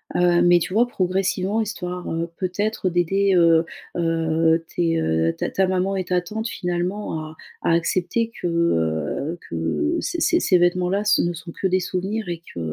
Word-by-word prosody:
heu, 175 -1 +4
mais 175 0 +6
tu 180 +2 -4
vois, 235 +4 +4
progressivement 190 +1 0
histoire, 180 -4 -4
heu, 165 +1 -2
peut-être 195 +2 -1
d'aider, 195 +3 +2
heu, 165 -1 +5 0.3
heu, 165 -1 +1
tes, 165 -1 +1
heu, 80 - +1
ta - - -2
ta 190 -1 +1
maman 185 +1 0
et 190 - -1
ta 180 0 +1
tante 220 +6 -4
finalement 180 0 -3
à 155 - -11 0.3
à - - +2
accepter 185 +7 0
que, - - 0
heu, 140 - 0
que 85 - -1
ces 340 - -3
ces 340 - +3
ces 185 - +3
vêtements-là 180 +3 +1
ce 205 - +4
ne 175 - 0
sont 170 +1 -9
que 190 - -6
des 185 0 +2
souvenirs 190 +3 -3
et 170 -1 -4
que, - - -6
180 Hz, 180 wpm, -22 LUFS, 165-195 Hz, 0.3 s, mais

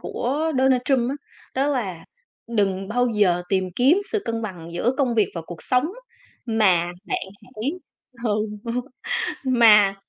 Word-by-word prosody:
của 300 +6 -1
Donald 260 -1 +4
Trump 255 -3 +2
á, 280 - -3 0.4
đó 270 +2 +1
là 200 - -2 0.4
"Đừng 195 -4 0
bao 245 +3 +2
giờ 195 -5 +2
tìm 190 -2 0
kiếm 275 +10 +5
sự 430 - 0
cân 230 0 -2
bằng 180 -6 -6
giữa 225 +8 +1
công 255 -4 +2
việc 215 -3 +3
và 170 - -4
cuộc 170 -2 -9
sống, 250 +1 +2 0.6
mà 195 -7 +3 0.2
bạn - - 0 0.2
hãy" 245 +2 -4 0.5
ừ, 225 - +1 1.1
"mà 220 -6 +6
225 Hz, 150 wpm, -23 LUFS, 195-255 Hz, 1.1 s, mà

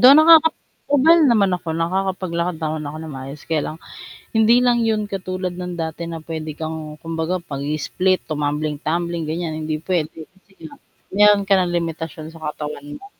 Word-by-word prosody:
Though, 260 +3 +9
nakaka 320 0 +8 0.5
ubal 325 +5 +6
naman 200 -4 +4
ako, 175 - -10
nakakapaglakad 180 0 -1
naman 155 -1 -3
ako 145 +2 -6
ng 160 -3 -7
maayos, 135 +2 -8
kaya 155 -3 +1
lang, 155 - -6 0.6
hindi 220 +2 +5
lang 245 -1 +4
'yon 215 -1 +1
katulad 185 -1 -3
ng 180 0 -5
dati 160 +1 -6
na, 165 -1 -6
puwede 160 -1 -4
kang, 160 0 -3 0.2
kumbaga, 165 +2 -2 0.2
pag-i-split, 155 +6 0
tumambling-tumbling, 155 +3 -1
ganiyan. 160 -1 -3
Hindi 155 0 -2
puwede, 165 -3 -1
kasi 190 +1 -29
nga, - - -10 0.4
meron 205 -1 +5
ka 200 - +4
ng 175 -1 0
limitasyon 165 -2 -4
sa 165 -1 -12
katawan 150 -1 -7
mo. - - -14
165 Hz, 165 wpm, -21 LUFS, 155-190 Hz, 0.6 s, Though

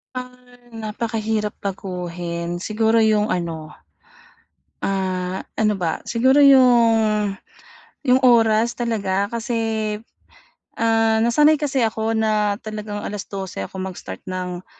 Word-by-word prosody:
Ah 250 -1 -9 0.2
napakahirap 220 -1 -2
baguhin 175 -3 -4
siguro 220 +3 +1
yung 215 -1 +2
ano, 165 -3 -3 1.1
ah, 185 -1 -1 0.2
ano 210 -2 +1
ba 165 -3 -2
siguro 260 +5 +3
'yong 225 -6 +4 0.7
'yong 255 +1 +4
oras 230 -2 +4
talaga 200 -4 0
kasi, 235 +1 -3 1.1
ah, 225 -1 +2
nasanay 295 +7 +4
kasi 265 -5 +1
ako 220 0 -1
na 210 -2 +1
talagang 210 -1 -5
12:00 195 - -5
ako 145 - -7
mag-start 185 - -7
ng, 180 -1 -5
215 Hz, 100 wpm, -21 LUFS, 190-230 Hz, 1.1 s, yong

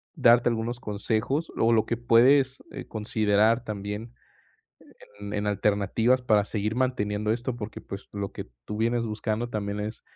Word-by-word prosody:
darte 120 +1 +5
algunos 115 +1 -2
consejos, 110 +8 -2
o 115 +1 +3
lo 110 -1 +3
que 115 - -2
puedes, 130 +3 +4
eh, - - -8
considerar 110 +1 +1
también 105 +1 -5 1.1
en 100 0 -6
en 105 0 -1
alternativas 105 +5 +1
para 105 -4 +3
seguir 105 +1 -2
manteniendo 105 -5 0
esto 120 +1 -3
porque, 110 -2 -7
pues, 100 0 -9
lo 100 -1 -4
que - - -7 0.2
tú 105 - -5
vienes 115 +1 +1
buscando 110 +1 -2
también 100 -2 -3
es, 105 +2 -5
110 Hz, 155 wpm, -26 LUFS, 105-120 Hz, 1.1 s, darte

